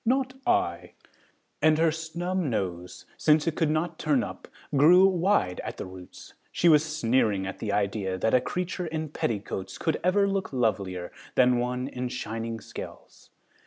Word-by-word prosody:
Not 260 +2 +1
I" 360 0 0 0.7
and 155 0 +4
her 165 0 +3
snub 170 +3 -3
nose 95 - -3
since 155 0 +3
it 165 -2 -1
could 160 - +1
not 155 +2 -1
turn 145 -6 +2
up 95 -2 -8 0.3
grew 175 +7 +7
wide 180 - +1
at - - -6
the - - -5
roots. 95 -1 -12 0.2
She 175 - +2
was 155 -2 +6
sneering 115 -9 +1
at 95 - -6
the 105 - -2
idea 100 -2 -1
that 110 +4 0
a 125 - +5
creature 180 +5 -3
in 160 -1 -3
petticoats 100 -7 -3
could 160 -2 -1
ever 200 +3 +3
look 195 -1 -2
lovelier 100 -8 -1 0.2
than 125 -1 +4
one 125 +1 -2
in 125 -2 -4
shining 115 -1 -4
scales. - - -10
135 Hz, 165 wpm, -27 LUFS, 105-170 Hz, 0.7 s, grew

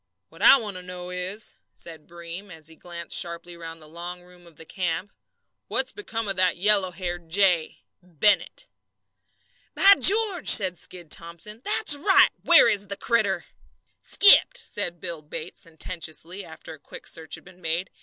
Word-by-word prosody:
"What - - -16
I - - +7
want 210 -6 -5
to - - -8
know 180 0 -9
is," 185 +4 -5 0.2
said 160 -3 -11
Breem, 170 +3 -10
as 160 -3 -10
he 160 - -16
glanced 170 0 -7
sharply 170 0 -3
round 165 -1 -10
the 155 - -16
long 175 +2 -9
room 180 -1 -20
of 165 - -19
the 160 - -14
camp, 180 +2 -4 0.5
"what's - - -2
become 230 - -6
of 195 - -2
that 185 -1 +1
yellow 200 0 +4
haired 175 -2 -7
jay 180 -3 +1 0.2
Bennett?" 180 +4 -1 1.1
"By 395 +1 +7
George!" 405 -4 +5
said 190 -5 +6
Skid 175 -4 -8
Thomson, 170 +7 -4
"that's 415 -6 +3
right! 380 +7 +4
Where 340 -6 +6
is 205 -3 -1
the 200 +1 -6
critter?" 205 -6 -1 0.6
"Skipped!" 410 +4 +4
said 205 - -5
Bill 170 -3 -6
Bates, 155 +4 -10
sententiously, 165 +1 -6
after 160 -1 -12
a 155 - -15
quick - - -13
search 160 -1 -4
had - - -15
been 180 0 -19
made. 170 +2 -4
180 Hz, 165 wpm, -24 LUFS, 170-205 Hz, 1.1 s, I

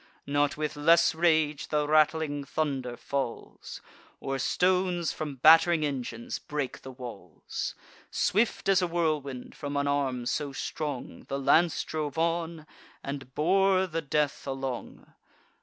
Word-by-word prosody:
Not 145 0 +1
with 150 0 -2
less 160 +3 +5
rage 160 -3 +2
the 150 -1 0
rattling 155 -1 +2
thunder 135 -4 -2
falls, 135 -2 -5 0.4
Or 135 0 -3
stones 180 0 +1
from 150 -3 -5
batt'ring 160 +3 +6
engines 125 -5 -4
break 145 -3 -4
the 135 - -9
walls: 120 - -7 0.3
Swift 215 +1 +1
as 195 -1 +4
a 180 - +1
whirlwind, 155 -6 -2
from 145 -1 -4
an 140 - +1
arm 135 -4 0
so 140 +3 -2
strong, 145 -1 -5
The 140 - -2
lance 160 +5 +3
drove 150 -3 -4
on, 165 -1 -1 0.4
and 135 -2 -6
bore 190 +3 +3
the 165 -2 -3
death 150 -1 -1
along. 135 -2 -5
150 Hz, 130 wpm, -28 LUFS, 135-165 Hz, 0.4 s, batt'ring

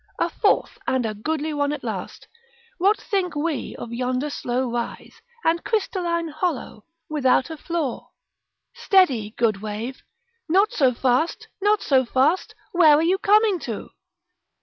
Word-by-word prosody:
A - - +1
fourth, 415 - +1
and 260 -2 +1
a 215 - -2
goodly 310 +8 -2
one 285 -1 0
at 295 - -5
last. - - -6 0.5
What 400 +4 +3
think 370 -7 -2
we 295 -1 -2
of 235 - -7
yonder 255 +4 -1
slow 250 -1 -2
rise, 235 0 -5 0.2
and 335 +1 +1
crystalline 350 -6 -1
hollow, 310 - -3 0.2
without 270 -1 +2
a - - -4
flaw? 315 -5 -3 0.6
Steady, 255 - +2
good 215 -4 +1
wave; 220 +5 -5 0.5
not 390 +6 +4
so 260 -5 +3
fast; 255 +7 0
not 415 +1 +2
so 265 -2 +3
fast; 270 +8 +1 0.2
where 335 -6 +6
are 305 - +2
you 370 +3 +2
coming 420 -2 +4
to? 230 -8 -6
295 Hz, 145 wpm, -23 LUFS, 250-350 Hz, 0.6 s, where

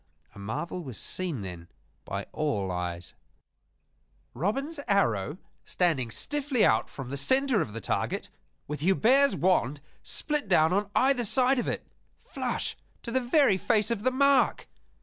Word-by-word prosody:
A - - -12
marvel 150 - -4
was 130 -8 -8
seen 175 - -3
then 90 -3 -7 0.4
by 100 0 -4
all 105 -12 -1
eyes 90 -1 -4 1.2
Robin's 275 - -2
arrow 135 - +1 0.3
standing 155 -10 0
stiffly 280 - 0
out - - +2
from 135 -2 -8
the - - -2
center 260 - +2
of 105 - -4
the 115 - -5
target, - - -2 0.4
with 150 +1 -4
Hubert's 235 - +4
wand 150 -6 +1 0.2
split 295 -5 -3
down 160 -2 +4
on 200 +1 0
either 260 -1 +3
side 255 +3 +3
of - - -2
it - - -2 0.4
flush - - -3 0.3
to 235 - -5
the 260 +2 +1
very 245 -5 +3
face 215 +4 +1
of 225 -3 -1
the 255 - +2
mark! 275 0 +3
185 Hz, 150 wpm, -28 LUFS, -, 1.2 s, Hubert's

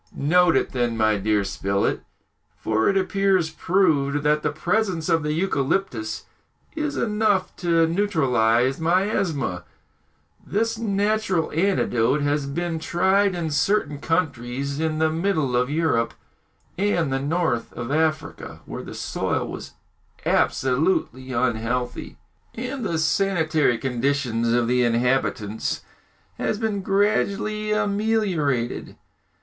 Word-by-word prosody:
"Note 175 +3 +3
it - - -1
then, 120 -2 -1
my 110 -1 +3
dear 105 0 +1
Spilett; 100 +1 -1 0.6
for 110 0 +1
it 195 - +2
appears 190 -3 +1
proved 155 -5 +1
that 150 0 +2
the - - 0
presence 180 +1 -1
of 165 -1 +3
the 150 0 -2
eucalyptus 145 - -1 0.5
is 300 -2 -2
enough 210 -3 +1
to 170 -2 +3
neutralise 135 - +2
miasmas. 165 - 0 0.8
This 225 +2 -1
natural 205 -4 0
antidote 150 - +1
has 145 0 0
been 165 +3 -2
tried 190 +4 +2
in 165 -3 -2
certain 150 -2 +1
countries 140 -4 -2
in 160 -1 -1
the 160 0 +2
middle 160 -6 0
of 125 +1 +1
Europe 150 -7 0 0.6
and 170 -8 +1
the 135 - 0
north 145 -4 -1
of 120 +2 -5
Africa, 155 +1 -1
where - - -6
the - - -9
soil - - -2
was - - -8 0.5
absolutely 130 -1 +1
unhealthy, 120 0 -2 0.4
and 250 +2 -4
the 170 -6 -1
sanitary 160 -5 +2
condition 125 -2 0
of 120 -1 +2
the 125 +1 +2
inhabitants 115 -3 0 0.6
has 215 - 0
been 215 -3 -1
gradually 210 +2 0
ameliorated. 200 - 0
160 Hz, 115 wpm, -23 LUFS, 125-195 Hz, 0.8 s, Note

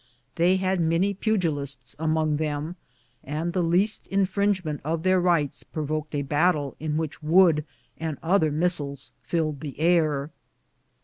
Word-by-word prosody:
They 175 +3 +4
had 185 -1 0
many 165 +5 +2
pugilists 145 - -2
among 155 -1 +1
them, 155 +2 -3 0.5
and 155 +5 -3
the 185 - +1
least 180 +6 +1
infringement 195 -5 0
of 160 +2 -2
their 185 0 +4
rights 170 -6 +1
provoked 155 0 -4
a 140 - 0
battle 145 0 +1
in 155 -1 -2
which 160 -2 -4
wood 160 -1 +5 0.4
and 160 -3 -3
other 165 -1 +3
missiles 145 -4 -2
filled 155 -4 -1
the 145 -2 -7
air. 155 -3 +2
160 Hz, 135 wpm, -25 LUFS, 150-180 Hz, 0.5 s, wood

